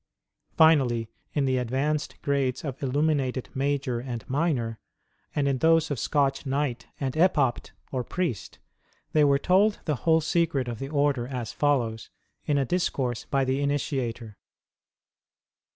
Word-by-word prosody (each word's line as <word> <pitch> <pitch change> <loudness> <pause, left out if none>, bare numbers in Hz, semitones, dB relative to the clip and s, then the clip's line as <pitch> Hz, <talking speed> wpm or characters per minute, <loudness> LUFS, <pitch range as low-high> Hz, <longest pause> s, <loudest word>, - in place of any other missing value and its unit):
Finally, 130 -8 +4 0.2
in 145 -2 +1
the 130 -1 +1
advanced 135 +5 -1
grades 135 -2 0
of 140 -4 -5
Illuminated 135 -2 0
Major 135 -2 -1
and 120 -2 -6
Minor, 130 -6 -1 0.6
and 145 -2 +1
in 135 -2 0
those 165 0 +3
of 140 - -2
Scotch 140 0 +1
Knight 135 -3 -2
and 135 -2 -2
Epopte 150 -7 +2 0.2
or 130 -2 -1
Priest 130 - -3 0.6
they 155 - +5
were 140 -1 +4
told 195 +7 +3
the 150 -4 0
whole 160 +7 +3
secret 160 -5 0
of 115 -2 -5
the 135 - -5
Order 140 -4 +1
as 125 -4 -5
follows, 120 -7 0 0.4
in 145 - +2
a 135 - +2
discourse 130 -7 -1
by 135 -1 +1
the 130 +2 0
initiator. 130 -6 -2
140 Hz, 140 wpm, -26 LUFS, 125-150 Hz, 0.6 s, they